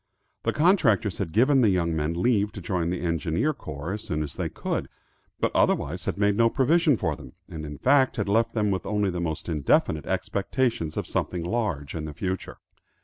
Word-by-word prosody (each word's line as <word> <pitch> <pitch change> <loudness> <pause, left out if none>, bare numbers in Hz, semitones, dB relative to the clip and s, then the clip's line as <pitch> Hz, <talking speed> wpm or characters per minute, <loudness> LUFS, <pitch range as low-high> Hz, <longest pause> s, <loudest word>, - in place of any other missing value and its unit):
The - - 0
contractors 135 - +3
had 90 -5 -2
given 130 - +4
the 110 - +5
young 85 -3 +1
men 80 +2 -1
leave 105 -1 +2
to - - -7
join 85 -1 -1
the 90 -1 -2
engineer 85 - 0
corps 75 - -6
as 105 - -4
soon 75 -2 -2
as 75 - -6
they - - -3
could, - - -3 0.5
but - - +1
otherwise 90 +7 +1
had - - -2
made 100 0 +2
no 115 +1 +4
provision 150 +2 +3
for 80 -6 -1
them, 65 -3 -12
and 80 -1 -7
in 75 -1 -7
fact 135 - +3
had 105 - -2
left 110 +3 +2
them 105 -2 +1
with 95 -2 -2
only 105 -2 +1
the 90 -1 -3
most 80 -3 -3
indefinite 75 -1 +1
expectations 100 - -1
of - - -1
something 90 -2 -2
large 85 - -2
in 80 -2 -4
the 75 - -6
future. 95 +1 -4
95 Hz, 205 wpm, -26 LUFS, 80-115 Hz, 0.5 s, the